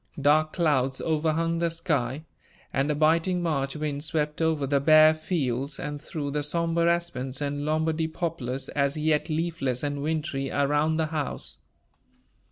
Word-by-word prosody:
Dark 155 +2 +3
clouds 135 -6 +1
overhung 165 +1 0
the 170 0 +1
sky, 155 -4 -1 0.5
and 135 +2 +1
a 150 - +1
biting 165 +4 +2
March 140 -5 -1
wind 150 -1 -3
swept 150 0 -2
over 160 -3 +1
the 140 +1 +2
bare 155 +2 +7
fields 140 -4 -2
and 145 0 -5
through 145 -2 -4
the 150 +1 -1
somber 170 +3 +1
aspens 140 -7 -2
and 145 0 -2
Lombardy 160 +1 0
poplars, 160 -6 -3
as 140 0 0
yet 155 0 +1
leafless 155 -6 -1
and 145 -1 -2
wintry, 150 -3 -2
around 145 +3 +1
the 160 - +1
house. 155 -2 -4
150 Hz, 150 wpm, -26 LUFS, 140-160 Hz, 0.5 s, bare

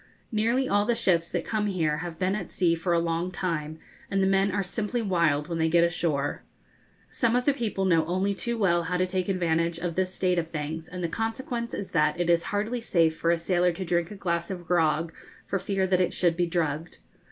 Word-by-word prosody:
Nearly 235 +4 +1
all 205 -1 +2
the 240 - +2
ships 175 -7 +2
that 175 -2 -2
come 215 -1 -1
here 160 -6 0
have 170 0 -6
been 185 +2 0
at 205 -4 -4
sea 175 -2 +2
for 175 +2 -2
a 170 - +4
long 170 +1 -1
time, 165 -4 -3 0.3
and 195 - 0
the 190 - +3
men 195 +1 +3
are 200 +1 0
simply 210 +5 -2
wild 170 -8 +1
when 170 -2 -3
they 160 0 +2
get 170 +1 +4
ashore. 160 -4 0 0.7
Some 235 -1 +1
of 250 0 +1
the 285 - +4
people 215 -7 -2
know 165 -3 +4
only 185 +3 0
too 235 +4 -2
well 175 -5 +3
how 180 +1 -1
to 185 - +2
take 185 0 -2
advantage 170 -2 +1
of 170 0 -3
this 185 +1 0
state 180 -2 +1
of 165 -1 -4
things, 160 +1 -4
and 180 0 -6
the - - +1
consequence 235 +4 -3
is 200 - -5
that 150 +1 +2
it 175 -1 +2
is 170 -1 +2
hardly 220 +4 -2
safe 165 -7 +2
for 165 - -1
a 170 - +4
sailor 180 +1 +2
to 185 +2 -5
drink 170 0 0
a 210 - -8
glass 170 -3 -2
of 180 -3 -6
grog, 165 -1 +1 0.3
for 195 - -1
fear 195 0 0
that 185 -1 +2
it 180 - 0
should 175 -2 +2
be 175 0 +1
drugged. 165 -1 -2
180 Hz, 230 wpm, -27 LUFS, 165-195 Hz, 0.7 s, a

